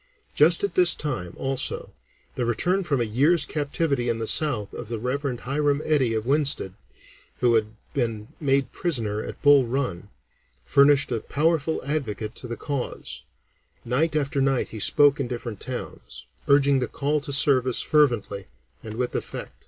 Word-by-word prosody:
Just - - +5
at 405 - -1
this 365 -2 +5
time, 120 - -4
also, 135 -1 -3 0.4
the 125 - -3
return 180 - 0
from 145 -6 -1
a - - +1
year's 140 +10 +2
captivity 145 -4 -2
in 115 - 0
the 115 - -3
South 120 -6 +2
of 120 - -7
the 115 +1 -4
Rev. 125 +2 -3
Hiram 145 +2 0
Eddy 135 -7 +1
of 110 0 -2
Winsted, 140 -8 +1 0.7
who 120 -1 +3
had 110 -1 0 0.2
been 115 -6 -3
made 135 -2 0
prisoner 110 -11 -2
at - - -8
Bull 145 -2 +6
Run, 115 -7 -3 0.6
furnished 140 -1 +4
a 115 - 0
powerful 160 +2 -1
advocate 120 -7 -3
to 125 - -8
the 120 -1 -6
cause; 130 - -5 0.6
night 150 +7 0
after 140 -1 0
night 135 -1 0
he 110 - -8
spoke 145 +6 +4
in 135 - -2
different 120 -4 -6
towns, 130 -1 -8 0.2
urging 140 -1 +4
the 125 - -1
call 145 +4 -1
to 145 0 -5
service 130 -3 +3
fervently 120 -10 +1 0.3
and 110 -1 -8
with 125 +1 -2
effect. - - -5
135 Hz, 160 wpm, -24 LUFS, 115-145 Hz, 0.7 s, Bull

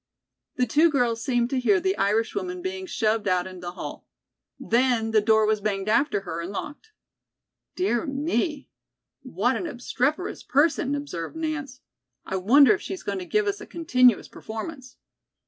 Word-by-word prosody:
The 250 - +2
two 305 +8 +4
girls 240 -6 0
seemed 245 -2 0
to 265 - +1
hear 210 -6 +3
the 190 +1 0
Irish 210 +3 +1
woman 365 -3 -4
being 375 0 -4
shoved 220 - 0
out 180 -1 +2
in 185 -1 -9
the 175 0 -6
hall. - - -8 0.5
Then 235 -2 +1
the 215 -1 +4
door 220 0 +4
was 215 -1 +1
banged 200 -1 -2
after 230 0 +2
her 170 -3 -5
and 170 - -5
was 200 - -8
locked. 295 - -7 0.9
"Dear 330 -6 0
me, 285 +1 -1 0.5
what 245 -1 0
an 350 - -3
obstreperous 275 +4 -2
person," 285 -1 +2
observed 280 - -5
Nance. 310 -5 -4 0.4
"I 190 - -2
wonder 235 +6 +6
if 190 - -3
she's 190 - -6
going 200 -1 -3
to 180 - -6
give 425 0 +1
us 405 0 -2
a - - -9
continuous 255 -8 +3
performance." 255 +4 -8
245 Hz, 170 wpm, -25 LUFS, 210-295 Hz, 0.9 s, wonder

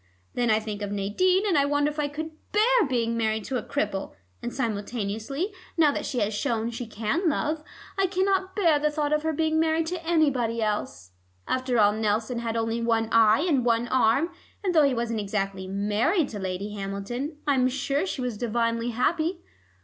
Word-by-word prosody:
Then 240 -1 0
I 215 0 +4
think 215 -1 -6
of 205 -1 -3
Nadine, 290 - +2
and 285 -1 +3
wonder 290 +1 +2
if 300 - -7
I 295 - +1
could 315 +2 -5 0.2
bear 445 - +4
being 230 -2 0
married 220 -1 0
to 260 - -2
a - - -2
cripple, 205 -8 -3 0.3
and 240 - -4
simultaneously, 225 - -3 0.2
now 310 -3 +5
that - - -3
she 260 - -3
has 210 +1 0
shown 225 +2 -1
she 235 0 -5
can 225 - 0
love, 305 +1 -1 0.4
I 385 - +4
cannot 380 0 0
bear 335 -7 +3
the 300 +1 +2
thought 300 0 -1
of 300 - +2
her 320 +1 0
being 315 +1 +1
married 320 0 +2
to 345 +1 -4
anybody 280 -9 +1
else. 210 - -2 0.4
After 255 -1 0
all 205 -1 +5
Nelson 220 +3 0
had 230 -1 -2
only 225 +1 -1
one 225 -1 +1
eye 225 +2 +5
and 280 -7 +2
one 235 0 +2
arm, 260 +6 +3 0.3
and 375 -3 +1
though 310 -3 +6
he 275 -2 +2
wasn't 230 -1 -1
exactly 195 -2 -2
married 210 - +1
to 210 - -6
Lady 190 +2 -4
Hamilton, 205 +9 -4
I'm 265 -3 +3
sure 275 +5 -1
she 285 - -3
was 245 -4 -3
divinely 230 0 0
happy. 325 +9 0
245 Hz, 190 wpm, -26 LUFS, 220-305 Hz, 0.4 s, though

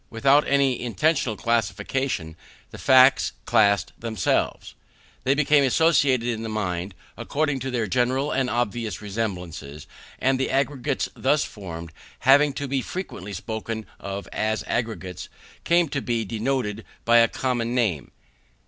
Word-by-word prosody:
Without 135 +6 +3
any 135 -2 +2
intentional 130 -2 0
classification, 115 - -1 0.4
the - - -10
facts 130 0 +5
classed 100 -5 +3
themselves. 110 -5 -1 0.5
They 135 +2 +3
became 150 0 +4
associated 135 -3 +3
in 115 -2 -2
the 115 - -4
mind, 95 -3 -3 0.2
according 145 -2 -1
to 130 +1 -4
their 120 -3 -1
general 130 +6 0
and 130 -2 0
obvious 120 -2 -2
resemblances; 90 -9 -5 0.3
and 130 0 +1
the 130 - 0
aggregates 135 0 0
thus 145 +3 +2
formed, 85 -5 -8 0.3
having 145 +2 +5
to 140 +1 -4
be 135 0 0
frequently 110 - -6
spoken 110 +3 -5
of 100 0 -6
as 110 0 -1
aggregates, 95 -7 -4 0.4
came 170 0 +3
to 140 - -2
be 115 -3 -1
denoted 115 0 -2 0.2
by 120 0 +5
a 115 - +6
common 120 -1 -2
name. 100 - 0
120 Hz, 135 wpm, -24 LUFS, 105-135 Hz, 0.5 s, a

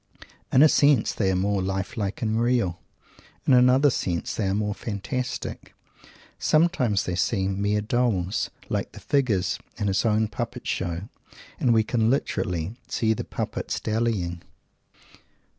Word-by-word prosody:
In 130 - +6
a - - +9
sense, 145 -5 +4
they 95 -3 0
are 95 - +1
more 100 +1 +1
life 95 0 -3
like 105 +2 -3
and 110 +1 +1
real. 120 -8 +1 0.7
In 135 - +4
another 130 +3 +5
sense, 85 -7 -2
they 105 - -1
are 95 - +1
more 105 0 -1
fantastic. 120 +5 -5 0.6
Sometimes 155 - +2
they 90 - -3
seem 95 +1 0
mere 105 +1 +1
dolls 110 -4 0 0.2
like - - -3
the - - -10
figures 125 -10 0 0.2
in 105 - -2
his 100 -1 +1
own 110 -1 +2
puppet 120 +3 -5
show 90 +1 -2 0.5
and 125 - +3
we 110 -1 +4
can 110 0 +1
literally 90 - -1
"see 110 -2 +1
the - - -4
puppets - - -4
dallying." 105 -6 -1
110 Hz, 145 wpm, -25 LUFS, 95-125 Hz, 0.7 s, a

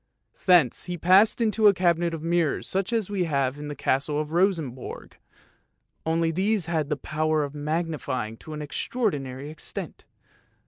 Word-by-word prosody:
Thence 170 -10 +4
he 180 0 -4
passed 190 +8 +5
into 220 -1 +3
a 200 - +6
cabinet 175 -1 +2
of 155 - -8
mirrors 170 -2 0
such 195 +3 -1
as 220 -4 -1
we 190 -3 0
have 140 -3 0
in 150 - -6
the 145 - -5
Castle 140 +3 0
of 155 0 -3
Rosenborg, 165 -8 -1 0.9
only 165 0 +2
these 195 +2 +1
had 160 -3 -1
the 150 - 0
power 155 +2 0
of 140 -1 -5
magnify 150 -6 -2
ing 110 - -11
to 155 - -10
an 150 0 -5
extraordinary 145 - -2
extent. 155 - -7
160 Hz, 165 wpm, -26 LUFS, 145-180 Hz, 0.9 s, a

